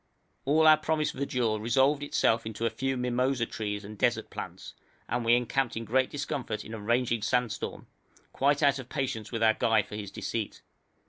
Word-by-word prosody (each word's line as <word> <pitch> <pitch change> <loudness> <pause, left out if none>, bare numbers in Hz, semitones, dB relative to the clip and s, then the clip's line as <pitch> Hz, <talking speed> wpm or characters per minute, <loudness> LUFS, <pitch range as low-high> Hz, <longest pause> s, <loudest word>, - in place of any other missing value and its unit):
All 155 +3 +4
our 155 0 +8
promised 155 -1 0
verdure 125 -5 -1
resolved 135 +5 +3
itself 115 -5 +1
into 110 +1 -3
a 115 - +1
few 135 0 -2
mimosa 125 0 0
trees 105 -2 -4
and 105 0 -10
desert - - +1
plants, - - -7 0.3
and 120 +1 -1
we 115 +1 +5
encamped 125 0 0
in 115 - -4
great 130 +3 +2
discomfort 135 -7 -4
in 110 - -8
a 110 - -5
raging 115 +1 +1
sandstorm, 125 +1 -1 0.5
quite 145 +2 +2
out 140 -1 +4
of 130 -1 -9
patience 120 -7 -3
with 115 -2 -1
our 110 -1 +6
guide 110 -1 +2
for 105 - -8
his 105 -2 -5
deceit. 110 +1 -4
120 Hz, 185 wpm, -29 LUFS, 110-135 Hz, 0.5 s, our